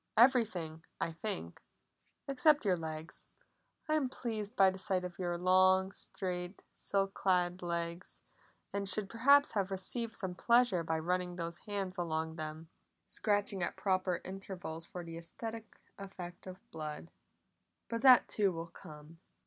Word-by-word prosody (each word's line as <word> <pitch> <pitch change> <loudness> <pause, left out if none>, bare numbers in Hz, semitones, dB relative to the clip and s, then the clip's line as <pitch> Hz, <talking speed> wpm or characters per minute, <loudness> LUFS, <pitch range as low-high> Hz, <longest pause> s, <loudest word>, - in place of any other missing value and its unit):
Everything, 215 - +3 0.2
I 165 - -1
think, 165 - -4 0.7
except 285 +1 +4
your 190 -3 +4
legs; 160 -1 -7 0.6
I 310 - +1
am 295 -4 +2
pleased 220 -3 -4
by 195 -1 +6
the 190 - -8
sight 190 -2 0
of 180 0 -8
long, 185 +2 +3
straight, 180 -1 -5
silk 195 -1 -1
clad 180 -1 +1
legs, 170 0 -4 0.5
and 200 -1 0
should 200 0 +1
perhaps 280 +7 +5
have 200 -3 0
received 220 +5 -3
some 190 -3 -3
pleasure 235 -2 +4
by 160 0 -1
running 180 +2 -1
these 170 -1 -5
hands 195 -3 -3
along 160 -1 -2
them 155 +1 -6 0.3
scratching 205 -2 0
at 175 - -2
proper 185 -2 0
intervals 185 -4 -6
for 180 - -7
the 165 -1 -7
aesthetic 225 +6 -6 0.2
effect 190 -2 -8
of 185 0 -7
blood. 155 +1 -6 0.8
But 230 -1 -3
that 255 -1 +8
too 200 -3 +2
will 165 -1 -6
come." 150 +2 -12
185 Hz, 140 wpm, -34 LUFS, 170-205 Hz, 0.8 s, that